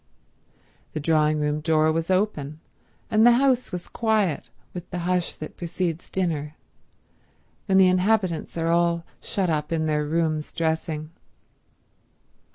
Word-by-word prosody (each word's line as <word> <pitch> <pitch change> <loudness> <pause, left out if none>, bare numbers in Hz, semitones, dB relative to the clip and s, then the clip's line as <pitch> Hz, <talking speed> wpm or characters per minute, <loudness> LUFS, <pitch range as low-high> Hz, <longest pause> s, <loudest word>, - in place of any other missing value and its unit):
The 155 - -2
drawing 155 0 +2
room 150 0 0
door 155 0 +3
was 165 +2 -2
open, 170 -7 0 0.5
and 215 0 +4
the 240 +1 +8
house 255 -1 +2
was 180 -2 -5
quiet 215 -8 0 0.2
with 180 0 -7
the 180 - -4
hush 180 -1 0
that 155 - -9
precedes 175 -1 -3
dinner, 155 -5 -2 1.1
when 190 -1 +3
the 190 - +7
inhabitants 185 -2 +1
are 165 0 0
all 170 0 +2 0.2
shut 185 -4 -1
up 150 0 -1
in 160 -1 0
their 150 -1 0
rooms 155 -1 -1
dressing. 160 -1 -2
165 Hz, 135 wpm, -24 LUFS, 155-185 Hz, 1.1 s, the